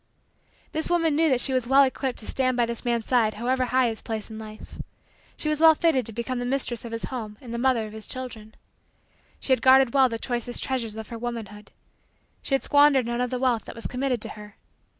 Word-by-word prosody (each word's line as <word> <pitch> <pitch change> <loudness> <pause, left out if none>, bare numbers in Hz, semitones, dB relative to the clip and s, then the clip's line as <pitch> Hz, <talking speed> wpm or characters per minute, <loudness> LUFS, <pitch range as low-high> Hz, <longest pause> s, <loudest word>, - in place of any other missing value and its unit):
This 315 +1 -3
woman 330 -3 +2
knew 320 +1 +3
that 255 -3 +2
she 265 - +1
was 255 -2 0
well 270 +2 +6
equipped 265 -1 -2
to 215 - -9
stand 255 0 0
by 240 - +3
this 235 0 -4
man's 235 -2 -1
side 225 -4 +2
however 255 +3 0
high 255 +1 +2
his 225 -1 -4
place 220 -1 -5
in 220 - -7
life. 215 0 -10 0.6
She - - -4
was 305 0 0
well 320 -1 +8
fitted 300 -8 +1
to - - -5
become 240 +3 -4
the - - -3
mistress 250 -2 -1
of 235 - -7
his 230 0 -4
home 215 -4 -6
and 235 -2 -9
the 235 - -3
mother 245 -3 +2
of 215 - -10
his 220 -1 -8
children. 225 -4 -7 0.8
She 265 - +1
had 255 - 0
guarded 260 -2 +5
well 265 -2 +5
the 230 - -3
choicest 240 0 -2
treasures 235 -5 -2
of 220 -1 -8
her 230 - -7
womanhood. 225 -3 -6 0.7
She 275 - 0
had 270 - -2
squandered 285 -3 +4
none 235 +1 -2
of 250 - 0
the 255 - -2
wealth 245 -3 0
that - - -9
was 230 - -6
committed 250 -2 -1
to - - -5
her. 210 -1 -11
245 Hz, 235 wpm, -25 LUFS, 225-265 Hz, 0.8 s, well